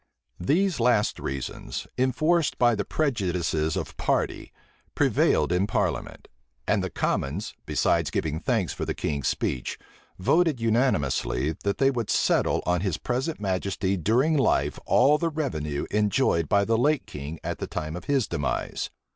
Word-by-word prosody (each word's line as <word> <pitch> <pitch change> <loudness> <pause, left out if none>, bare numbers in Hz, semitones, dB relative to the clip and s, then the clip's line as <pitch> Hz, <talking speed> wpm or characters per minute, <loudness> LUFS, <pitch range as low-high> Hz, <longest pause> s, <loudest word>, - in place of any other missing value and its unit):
These 170 - +1
last 115 -3 +2
reasons, 70 -1 -5
enforced 155 +6 +1
by 120 -1 +4
the 105 -2 -1
prejudices 90 - 0
of - - -5
party, - - -1 0.4
prevailed - - +2
in 90 +3 +2
parliament; - - -2 0.4
and - - +2
the - - -2
common's, 75 +10 -2
besides - - +1
giving 80 -1 -2
thanks 80 - 0
for - - -5
the - - -2
king's 70 -4 -2
speech, 60 - -2 0.4
voted 160 - +2
unanimously, 80 - +1
that 100 0 0
they 135 +1 +4
would 120 -5 -3
settle - - +2
on 90 -1 +1
his 95 -5 -1
present 130 - -2
majesty 95 0 -1
during 120 - +2
life 135 -6 +1
all 145 +4 +5
the 165 - +1
revenue 80 - -3
enjoyed 105 - +2
by 100 0 +3
the 115 +1 +1
late 150 +2 +2
king 75 +2 -7
at - - -4
the - - -4
time 80 +1 -4
of 90 - -7
his 135 -5 +1
demise. 70 -2 -2
105 Hz, 150 wpm, -26 LUFS, 80-135 Hz, 0.4 s, all